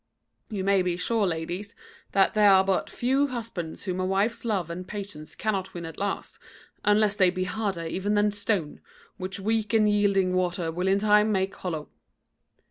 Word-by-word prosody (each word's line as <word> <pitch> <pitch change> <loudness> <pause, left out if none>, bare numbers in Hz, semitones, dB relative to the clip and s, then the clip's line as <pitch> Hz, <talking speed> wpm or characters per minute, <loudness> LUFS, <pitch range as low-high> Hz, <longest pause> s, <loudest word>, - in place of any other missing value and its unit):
"You 205 -4 -3
may 195 0 +3
be 180 -1 -1
sure, 210 +2 +1
ladies, 175 +4 -4 0.4
that 195 -1 +4
there 210 -1 +5
are 190 -1 +6
but 190 -1 0
few 265 +4 +1
husbands 230 - -5
whom 185 -2 -3
a 185 - 0
wife's 200 +4 0
love 195 -8 -1
and 180 +2 -6
patience 200 -7 -7
cannot 190 -3 -2
win 170 -1 -5
at 165 -2 -8
last, 200 0 -3 0.4
unless 210 0 +3
they 185 -2 +5
be 185 +1 -2
harder 190 -3 -2
even 190 +5 -1
than 210 0 +3
stone, 200 -6 -2 0.4
which 190 +1 -5
weak 220 +2 0
and 215 -1 +5
yielding 200 -3 +2
water 175 -2 0
will 180 +3 -2
in 195 +1 +4
time 210 +1 +4
make 190 -1 0
hollow." 160 -5 -5
195 Hz, 180 wpm, -26 LUFS, 180-210 Hz, 0.4 s, are